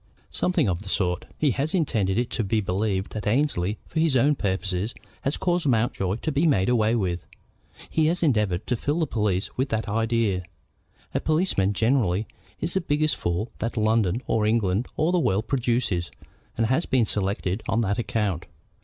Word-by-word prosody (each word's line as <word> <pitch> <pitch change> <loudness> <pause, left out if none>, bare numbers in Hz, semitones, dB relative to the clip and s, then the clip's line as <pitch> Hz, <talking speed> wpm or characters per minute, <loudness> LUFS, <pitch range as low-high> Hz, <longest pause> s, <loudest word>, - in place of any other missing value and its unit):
"Something 180 - +1
of 90 -1 -1
the 100 - -8
sort. 90 -3 0
He 150 -3 +2
has 145 - -1
intended 110 - +1
it 120 0 0
to 115 - -1
be 110 +2 +1
believed 95 0 -1
that 105 -2 -4
Annesley, 105 -5 +1
for 160 - -3
his 160 -5 +3
own 140 +5 +4
purposes, 95 -2 -2 0.3
has 140 - -1
caused 175 -3 0
Mountjoy 110 -6 +1
to 155 - -3
be 150 +4 +2
made 95 -10 +3
away 115 -2 +3
with. 90 -6 -1 0.6
He 155 -1 +2
has 175 +2 0
endeavored 105 - +1
to 125 - 0
fill 145 +7 -1
the - - +3
police 105 -8 -1
with 130 +1 +1
that 110 0 -1
idea. 115 -3 +1 0.7
A - - +1
policeman, 155 - +1
generally, 110 -3 +2 0.3
is 165 +2 -2
the 190 - +1
biggest 155 -2 +1
fool 85 +7 -2
that 115 +1 -3
London, 110 0 +2
or 105 -1 +1
England, 110 0 +1
or 155 +3 +2
the 180 - +3
world 110 - +1
produces, 120 -9 0 0.5
and 115 - +2
has 130 +9 +1
been 130 -3 +3
selected 100 0 -1
on 115 - +2
that 100 +1 0
account. 100 -7 -1
115 Hz, 180 wpm, -25 LUFS, 95-140 Hz, 0.7 s, own